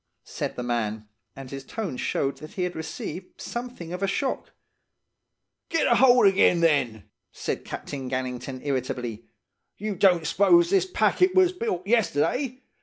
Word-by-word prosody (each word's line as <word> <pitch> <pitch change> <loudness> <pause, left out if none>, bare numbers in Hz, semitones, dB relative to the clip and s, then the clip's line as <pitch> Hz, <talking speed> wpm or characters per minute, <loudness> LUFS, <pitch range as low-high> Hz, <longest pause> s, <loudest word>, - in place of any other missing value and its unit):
said - - -4
the 125 - -4
man, 110 -3 -2 0.3
and 135 -1 -9
his 135 -1 -6
tone 195 - -4
showed 135 +2 -1
that 155 - -11
he 185 - -2
had 180 0 -3
received 160 +2 -7
something 240 -9 -6
of 180 - -5
a 195 - +1
shock. 260 +7 -2 1.2
"'Get 330 -2 +1
a - - +4
hold 250 -3 +6
again, 190 -3 +4
then!' 135 -10 +2 0.3
said - - -4
Captain 135 -3 -6
Gannington 130 +1 -4
irritably. 125 -4 -3 0.5
'You 210 0 -3
don't 180 -3 +4
s'pose 340 - +4
this 390 -1 +3
packet 365 0 +2
was 375 -1 +5
built 190 - -3
yesterday! 240 - +1
175 Hz, 150 wpm, -26 LUFS, -, 1.2 s, hold